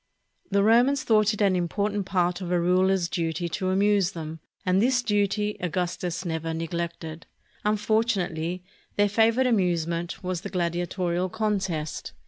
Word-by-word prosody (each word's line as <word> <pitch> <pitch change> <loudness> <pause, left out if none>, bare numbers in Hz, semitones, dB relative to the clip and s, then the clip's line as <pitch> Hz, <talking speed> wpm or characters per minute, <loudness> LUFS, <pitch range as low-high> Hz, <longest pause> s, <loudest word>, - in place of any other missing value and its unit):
The 200 0 +2
Romans 245 +6 +4
thought 215 -2 +4
it 210 - -4
an 195 -2 +3
important 200 +3 -1
part 180 -1 0
of 180 -1 -4
a 175 - +3
ruler's 185 +1 +2
duty 170 -1 -2
to 185 0 -2
amuse 195 -1 +2
them, 160 -1 -6 0.3
and 185 +1 +3
this 245 +1 +2
duty 210 -1 0
Augustus 180 0 -2
never 160 -1 -2
neg 165 +1 -4
lected. 170 -1 -5 0.4
Unfortunately, 205 -5 0 0.3
their 205 0 +4
favorite 225 +4 +3
amusement 175 -7 0
was 180 -2 -2
the - - -6
gladiatorial 175 +1 -1
contest. 190 -7 -2
185 Hz, 140 wpm, -26 LUFS, 170-210 Hz, 0.4 s, Romans